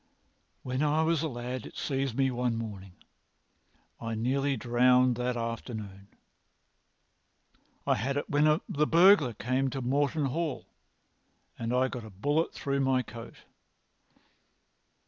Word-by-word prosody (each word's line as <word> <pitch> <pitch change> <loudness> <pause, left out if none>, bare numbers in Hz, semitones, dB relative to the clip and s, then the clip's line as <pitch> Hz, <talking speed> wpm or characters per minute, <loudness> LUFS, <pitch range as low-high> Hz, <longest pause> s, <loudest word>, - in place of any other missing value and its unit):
"When 130 +1 -2
I 150 +1 +2
was 160 -1 +1
a 160 - 0
lad 125 -2 -5
it - - -13
seized 135 -3 -2
me 135 -1 +2
one 125 -1 -1
morning. 100 -5 -7 1.1
I 115 -1 -4
was - - -4
nearly 135 +4 0
drowned 125 +1 +3
that 125 0 -1
afternoon. 110 -4 -5 1.8
I - - +3
had 135 +6 -1
it 145 - -2
when 145 +1 +2 0.2
the 150 +1 0
burglar 165 - +6
came 130 +4 0
to 135 - -4
Morton 145 +4 +1
Hall 155 +2 -2 0.9
and 115 0 -2
I 130 +1 +2
got 125 -2 -6
a 110 - -9
bullet 145 - 0
through 140 -1 -2
my 130 -1 +2
coat. 115 +1 -11
130 Hz, 135 wpm, -29 LUFS, 120-140 Hz, 1.8 s, burglar